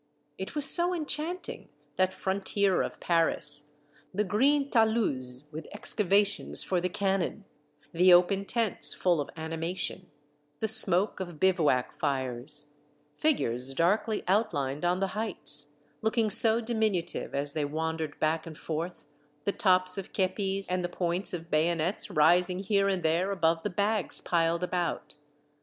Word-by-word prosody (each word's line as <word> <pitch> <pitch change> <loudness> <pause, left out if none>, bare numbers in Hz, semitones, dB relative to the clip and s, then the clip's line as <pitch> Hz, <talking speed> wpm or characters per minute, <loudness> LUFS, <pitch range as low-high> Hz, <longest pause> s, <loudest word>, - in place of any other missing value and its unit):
It 190 - -6
was 295 -2 +1
so 350 +1 +2
enchanting, 325 +3 -4 0.3
that 185 0 +1
frontier 195 0 0
of - - -5
Paris, 150 -3 0 0.4
the 205 +3 0
green 275 +8 +1
taluses 175 - +1
with 155 +2 -8
excavations 205 -1 +3
for 180 -2 -1
the 180 - -1
cannon, 195 +1 -2 0.5
the 180 +2 +5
open 185 +3 +4
tents 230 -2 0
full 175 -4 +1
of 145 - -6
animation, 165 +3 -4 0.5
the 220 - -1
smoke 200 -2 +5
of 175 -5 -7
bivouac 160 -9 +2
fires, 135 +2 -2 0.4
figures 135 - 0
darkly 205 - +1
outlined 150 -9 0
on 180 +2 0
the 195 - 0
heights, 210 -8 -3 0.2
— - - -38
looking 220 -1 +1
so 225 +1 +5
diminutive 220 -11 -2
as 140 +1 -2
they 155 - -1
wan 160 +2 -3
dered 155 -2 -5
back 160 +1 -1
and 155 -2 -9
forth, 165 +2 -5 0.2
— 150 0 -38
the - - +2
tops 185 -1 +2
of 195 - -9
kepis, 195 0 -1
and 180 0 -1
the 175 - -2
points 175 +2 0
of 170 -1 -7
bayonets 165 +4 0
rising 175 +4 +3
here 200 +1 +1
and 190 -3 -1
there 165 +4 +1
above 165 -4 +1
the 210 - -3
bags 205 +2 -1
piled 170 0 0
about. 180 -4 -3
180 Hz, 150 wpm, -28 LUFS, 160-205 Hz, 0.5 s, the